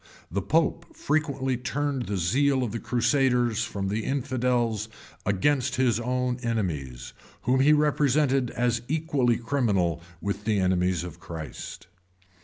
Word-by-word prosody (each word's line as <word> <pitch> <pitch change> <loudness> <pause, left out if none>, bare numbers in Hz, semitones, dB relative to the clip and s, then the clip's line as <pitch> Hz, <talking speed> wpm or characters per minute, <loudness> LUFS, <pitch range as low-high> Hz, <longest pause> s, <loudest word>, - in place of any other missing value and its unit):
The 100 +3 -1
pope 160 - 0
frequently 140 -4 0
turned 135 +1 -2
the 100 - -1
zeal 130 +10 +2
of 115 - -2
the 115 - -3
crusaders 125 -2 +2
from 100 -3 -3
the 105 +2 -1
infidels 120 -5 0 0.4
against 135 +7 +1
his 125 -3 +2
own 125 +1 -1
enemies, 80 - -3 0.3
whom 130 +2 +2
he 140 +3 +5
represented 145 -3 +3
as 120 -1 0
equally 140 -6 +1
criminal 105 - 0 0.2
with 100 +2 -3
the 110 -2 +2
enemies 90 -2 +1
of 90 -3 -8
Christ. 80 -6 -8
120 Hz, 130 wpm, -26 LUFS, 100-135 Hz, 0.4 s, he